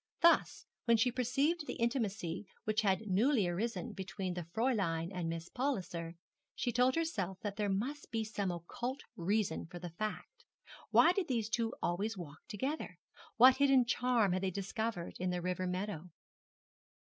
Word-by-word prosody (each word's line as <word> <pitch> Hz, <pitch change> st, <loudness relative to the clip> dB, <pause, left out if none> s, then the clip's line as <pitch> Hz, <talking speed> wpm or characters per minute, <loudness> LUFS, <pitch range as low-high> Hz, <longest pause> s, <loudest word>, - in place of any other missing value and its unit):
Thus 340 Hz, 0 st, +4 dB, 0.2 s
when 235 Hz, -1 st, +5 dB
she 250 Hz, +3 st, +3 dB
perceived 275 Hz, +6 st, +1 dB
the -, -, -3 dB
intimacy 210 Hz, -7 st, -1 dB, 0.2 s
which 215 Hz, 0 st, +1 dB
had 195 Hz, 0 st, +1 dB
newly 210 Hz, +2 st, +3 dB
arisen 225 Hz, +6 st, -2 dB
between 190 Hz, -1 st, -4 dB
the 175 Hz, -, -3 dB
Fräulein 180 Hz, -4 st, 0 dB
and 175 Hz, -3 st, -2 dB
Miss 165 Hz, 0 st, -4 dB
Palliser, 180 Hz, -11 st, -2 dB, 0.4 s
she 245 Hz, -, -1 dB
told 250 Hz, +2 st, +3 dB
herself 200 Hz, -, -1 dB
that 205 Hz, -1 st, -3 dB
there 210 Hz, -1 st, 0 dB
must 250 Hz, +10 st, -2 dB
be 225 Hz, -1 st, -1 dB
some 210 Hz, -3 st, -2 dB
occult 235 Hz, -, -4 dB
reason 185 Hz, -2 st, 0 dB
for 175 Hz, +1 st, -9 dB
the 175 Hz, -1 st, -6 dB
fact. 215 Hz, -, -5 dB, 0.5 s
Why 340 Hz, -, +7 dB
did 365 Hz, -1 st, -1 dB
those 230 Hz, -4 st, 0 dB
two 230 Hz, 0 st, 0 dB
always 200 Hz, +5 st, 0 dB
walk 150 Hz, -4 st, -8 dB
together? 260 Hz, -, -3 dB, 0.4 s
What 255 Hz, +3 st, +8 dB
hidden 270 Hz, -3 st, +5 dB
charm 240 Hz, -4 st, +2 dB
had 185 Hz, +1 st, 0 dB
they 190 Hz, -, +1 dB
discovered 200 Hz, 0 st, -3 dB
in 185 Hz, 0 st, 0 dB
the 180 Hz, 0 st, -1 dB
river 180 Hz, +1 st, -1 dB
meadow? 180 Hz, -2 st, -3 dB
210 Hz, 160 wpm, -34 LUFS, 180-245 Hz, 0.5 s, What